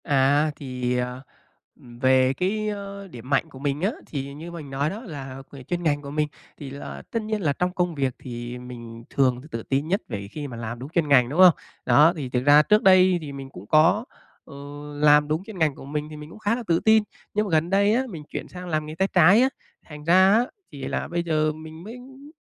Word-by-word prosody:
À, 145 +1 +3
thì, 125 -3 -3
ờ, 125 +1 -3 0.5
về, 130 +2 +2
cái, 210 +7 -1
ơ, 200 -1 -6
điểm 125 -6 -11
mạnh 145 +3 +1
của 130 - -12
mình 140 +1 -2
á, 195 +4 +1 0.2
thì 140 -1 -5
như 160 +4 -8
mình 160 -5 -8
nói 140 +2 -1
đó 210 +7 -6
là 135 - -7
về 140 -2 -10
chuyên 175 +6 -3
ngành 145 -3 +1
của 140 -1 -8
mình 150 0 0 0.3
thì 140 - -8
là 140 +1 -8
tất 230 - -1
nhiên 215 -1 -3
là 150 -5 +1
trong 180 +5 -1
công 175 -2 -1
việc 135 -3 -1
thì 120 0 -7
mình 115 -2 -10
thường 130 -2 +1
t 155 - -15
tự 115 -1 -4
tin 140 +3 -1
nhất 195 +6 0
về 100 -4 -5
khi 150 -2 -5
mà 120 -4 -8
làm 115 0 -5
đúng 130 +3 -7
chuyên 165 -1 0
ngành, 125 -4 +5
đúng 150 +6 -3
hông? 185 -2 +9 0.3
Đó, 155 +4 +6
thì 140 -5 -5
thực 125 0 -1
ra 145 +2 +7
trước 210 +7 +3
đây 185 -1 +6
thì 150 -2 -7
mình 135 -1 -8
cũng 100 -6 -12
có, 165 - +4 0.4
ờ, 140 - -13 0.4
làm 150 0 +5
đúng 155 +4 -1
chuyên 210 -1 -10
ngành 155 -4 +2
của - - -11
mình 150 +1 -3
thì 155 - -9
mình 150 0 -10
cũng 215 - -13
khá 215 +1 +1
là 245 - -5
tự 165 0 +3
tin, 220 -1 +4 0.3
nhưng 210 +1 +1
mà - - -5
gần 160 +1 +2
đây 200 +2 +3
á, 255 +3 +2
mình 165 -7 -8
chuyển - - -5
sang 180 0 -9
làm 155 -2 -1
nghề 155 +1 -7
tay 190 +3 +1
trái 185 +5 +6
á, 260 - +4 0.4
thành 150 -1 -9
ra 185 +4 +5
á 235 +3 +4 0.3
thì 140 -2 -9
là 140 - -2
bây 170 +1 -2
giờ 155 -2 +1
mình 160 +1 -10
mới 225 +5 -8
m 270 +3 -14
150 Hz, 250 wpm, -24 LUFS, 135-185 Hz, 0.5 s, hông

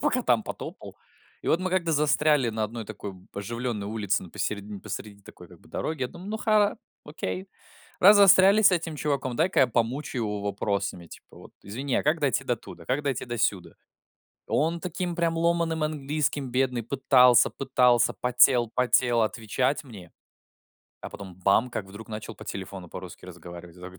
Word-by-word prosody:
пока - - +1
там - - +2
потопал. - - -8 0.5
И - - -4
вот 165 - +3
мы 185 0 -2
как-то 175 -3 0
застряли 150 -3 +3
на 110 -1 -1
одной 115 +1 -6
такой, 100 -2 -7
б, 95 0 -17
оживлённой 115 0 -4
улице, 105 -3 -1
н 90 - -13
по - - -14
середин 100 -1 -4
посреди 100 -1 -7
такой 90 -2 -14
как 90 -2 -17
бы - - -21
дороги, 155 -2 -4
я 125 - -1
думаю: 180 +8 -11
"Ну 220 - -2
ха 210 -1 +2 0.3
окей. 180 +5 -5 0.5
Раз 205 +3 +8
застряли 195 +1 +7
с 205 - +7
этим 165 -3 -1
чуваком, 140 -4 -2
дай-ка 175 +6 +2
я 130 - +6
помучаю 120 +2 -2
его 105 -1 -3
вопросами 100 -3 -2
типа - - -15
вот: - - -14
извини, 125 +6 -4
а - - +1
как 155 +3 +1
дойти 140 -1 0
до 120 - 0
туда? 115 - -12
Как 135 +3 -1
дойти 140 -4 -2
до 120 -1 -5
сюда?" 100 -4 0 0.8
Он 165 +3 0
таким 180 0 -4
прям 165 -1 0
ломаным 170 -1 +1
английским, 145 -2 -2
бедный, 125 -1 0
пытался, 125 -1 +5
пытался, 125 -3 +2
потел, 125 -1 +3
потел 125 -2 +3
отвечать 115 +6 -1
мне, 100 - -12 0.9
а - - -7
потом 95 -3 -10
бам 100 +7 +2
как 105 -4 -4
вдруг 100 +2 -11
начал 110 +1 -7
по - - -12
телефону 95 -2 -7
по-русски - - -10
разговаривать. 85 -1 -11
Я - - -15
такой 90 +1 -10
125 Hz, 185 wpm, -26 LUFS, 105-155 Hz, 0.9 s, Раз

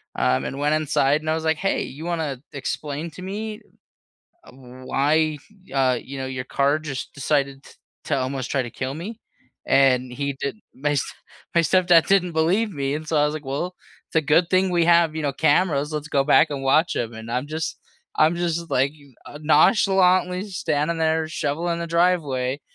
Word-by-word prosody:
um, 65 0 +1
and 135 - -5
went 150 +1 +2
inside, 150 -1 +1
and 155 - -4
I 160 - +2
was, 160 - -4
like, 160 -1 +1
"Hey, 195 - 0
you 150 +5 -8
wanna 155 -7 -3
explain 145 +3 -4
to 185 - -11
me, 210 +3 -5 0.8
uh, - - -15
why, 140 +4 -1 0.3
uh, 130 -3 +2
you 135 0 -8
know, 130 - -3
your 130 -1 -4
car 140 +3 +1
just 135 -4 -6
decided 140 -1 -1
t - - -16 0.3
to 145 - 0
almost 130 -1 -3
try 135 -2 +1
to 120 - -7
kill 130 +3 -4
me?" 215 +8 -7 0.4
And 130 -2 +3
he 140 +2 -2
did 140 - -3 0.2
my 145 +2 -1
s 140 - +1 0.5
my 170 - +5
stepdad 175 -1 +4
didn't 180 -3 +3
believe 185 +7 +1
me, 140 -1 -2
and 155 +1 -5
so, 160 - -1
I 145 - +4
was, 150 +1 -1
like, 155 -2 -6
"Well, 150 +7 -3 0.3
it's - - -6
a - - +6
good 155 +4 +2
thing 185 0 +3
we 170 -1 +2
have, 170 -2 +4
you 160 - -3
know, 140 -2 0
cameras, 155 -1 +2
let's 150 0 -4
go 140 -1 +1
back 155 +2 +5
and 140 -2 -4
watch 155 +5 +3
'em" 115 -1 -2
and 110 +1 -8
I'm 125 +4 -2
just 155 +1 -4 0.4
I'm 160 +3 +3
just, 170 -1 -2
like 135 +2 +2
you 140 -4 -20
uh, 145 - -10
nonchalantly 180 +3 +3
standing 165 -2 -1
there 160 0 +1
shoveling 165 +2 -2
the 170 - -3
driveway, 150 -6 +1
155 Hz, 200 wpm, -23 LUFS, 140-170 Hz, 0.8 s, a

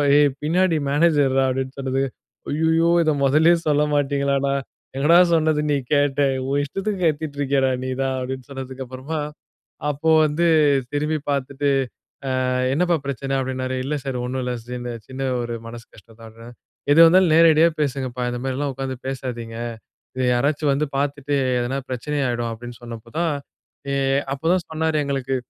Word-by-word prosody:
"ஏய்! 145 0 +5
பின்னாடி 170 +2 +2
மேனேஜர்ரா" 145 -4 +3
அப்பிடின்னு 130 +1 -3
சொன்னது, 135 0 -1 0.5
"ஐய்யய்யோ! 160 +2 +2 0.2
இத 155 - +3
மொதல்லயே 160 +5 +5
சொல்ல 150 0 +3
மாட்டீங்களாடா!" 140 -1 +1 0.4
"எங்கடா, 160 +5 +5 0.2
சொன்னது 155 -2 +2
நீ 145 - +3 0.2
கேட்ட. 145 -1 +1 0.3
உன் 140 +1 +1
இஷ்டத்துக்கு 195 +6 -3
கத்திட்டு 150 -2 -1
இருக்கியேடா! 135 -1 +2
நீ - - -3
தான்" 135 0 -1
அப்பிடின்னு 130 0 -5
சொன்னதுக்கு 135 -1 -6
அப்புறமா, 135 +5 -5 0.7
அப்போ 150 +3 0 0.2
வந்து 155 +3 0 0.5
திரும்பி 150 +2 0
பாத்துட்டு, 140 +1 -1 0.8
"ஆ - - +1 0.2
என்னப்பா 175 +3 +2
பிரச்சன" 135 0 -2
அப்பிடினாரு. 130 0 -3
இல்ல 150 +2 -1
சார், 135 -2 -2
ஒண்ணும் 130 +1 -3
இல்ல. 125 0 -2 0.3
இந்த 120 0 -4 0.2
சின்ன 130 +1 -5 0.2
ஒரு 120 0 -4
மனசு 115 0 -9
கஷ்டம்தான்ட்றேன். 115 +2 -14 0.4
"எதுவாருந்தாலும் 165 +3 +7
நேரடியா 165 0 +6
பேசுங்கப்பா! 130 -3 -2
இந்தமாரில்லாம் 135 +3 -2
உக்கார்ந்து 130 0 -4
பேசாதீங்க. 120 -4 -5 0.6
இத 130 - -1
யாராச்சும் 145 +4 +1
வந்து 145 +2 0
பாத்துட்டு 145 0 -1 0.3
எதனா 125 +3 -2
பிரச்சனை 130 +4 -3
ஆயிடும்" 120 -1 -1
அப்பிடினு 120 +1 -9
சொன்னப்போ 115 -1 -9
தான், 170 -2 +1 0.6
ஏ - - 0 0.4
அப்பதான் 165 +6 +1
சொன்னாரு 160 0 0
எங்களுக்கு. 135 -1 -1
140 Hz, 140 wpm, -22 LUFS, 130-150 Hz, 0.8 s, எதுவாருந்தாலும்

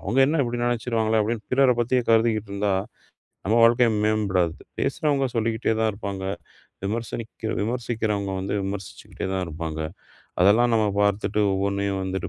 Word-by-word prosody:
அவங்க 115 +7 -1
என்ன 160 - +1
இப்டி 120 0 -3
நெனைச்சுருவாங்களே 115 -2 0
அப்டின்னு 110 +1 -3
பிறர 135 0 +5
பத்தி 125 +2 0 0.2
கருதுகிட்டுருந்தா 110 -3 +1 0.8
நம்ம 110 +4 +2
வாழ்க்கை 120 +1 +5 0.2
மேம்படாது. 95 -6 +1 0.3
பேசுறவங்க 140 0 +1
சொல்லிக்கிட்டே 110 0 0
தான் 110 -1 +2
இருப்பாங்க. 100 -2 -5 0.6
விமர்சனக்கி 115 +2 -4
விமர்சிக்கிறவங்க 110 -3 -2 0.3
விமர்சிச்சுக்கிட்டே 95 -2 -6
தான் 95 -1 -1
இருப்பாங்க. 80 -1 -5 0.6
அதெல்லாம் 110 +6 +5
நாம 110 -1 +3
பாத்துட்டு 105 +1 +1
ஒவ்வொண்ணையும் 100 0 -1
வந்து 95 -1 -3
110 Hz, 120 wpm, -24 LUFS, 100-115 Hz, 0.8 s, பிறர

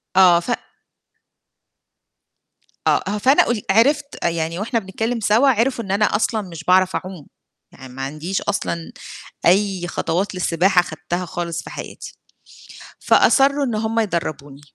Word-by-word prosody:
آه، 180 -2 +6
ف 240 - -5 2.4
آه، - - +3
ه 205 - -1
فأنا 260 +7 +4
قول 230 -4 -1
عرفت 280 +7 +3 0.2
يعني، 165 +1 -1
وإحنا 230 +2 -1
بنتكلّم 225 +5 -3
سوا، 220 +6 +3
عرفوا 240 0 +1
إن 195 - -5
أنا 205 +2 +2
أصلًا 220 0 0
مش 165 -4 -9
باعرف 185 +1 +3
أعوم، 185 -5 -6 0.4
يعني 130 -2 -13
ما 135 - -7
عنديش 155 +7 -3
أصلًا 170 -4 -3 0.6
أي 190 -1 +2
خطوات 185 +4 -2
للسباحة 180 +1 +2
خدتها 175 +3 -5
خالص 170 -1 -4
في - - -10
حياتي. - - -9 0.8
فأصرّوا 280 +1 +4
إن 235 -4 -2
هم 220 +1 -1
يدربوني. 155 -8 -3
190 Hz, 135 wpm, -20 LUFS, 170-225 Hz, 2.4 s, آه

